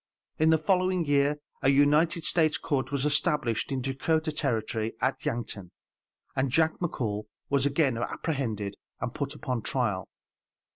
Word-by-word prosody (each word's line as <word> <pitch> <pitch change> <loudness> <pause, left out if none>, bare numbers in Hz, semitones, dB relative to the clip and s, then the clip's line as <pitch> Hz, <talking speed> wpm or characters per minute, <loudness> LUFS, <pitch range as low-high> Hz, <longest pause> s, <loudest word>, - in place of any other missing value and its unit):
In 155 +1 +5
the 160 - +6
following 185 +1 +2
year 145 0 +3 0.2
a 135 - +4
United 150 +4 +4
States 155 -1 +2
court 135 -3 -1
was 140 0 0
established 150 -7 +1
in 130 -2 -1
Dakotah 155 +4 0
Territory 115 -6 -1
at 130 +2 0
Yankton, 110 -6 -3 0.7
and 130 0 +1
Jack 160 +5 +2
McCall 110 - -2 0.3
was 140 0 +3
again 140 -4 +1
apprehended 115 - -2 0.3
and 120 - -3
put 140 0 -3
upon 130 -5 -2
trial. 105 -6 -1
140 Hz, 140 wpm, -28 LUFS, 120-155 Hz, 0.7 s, the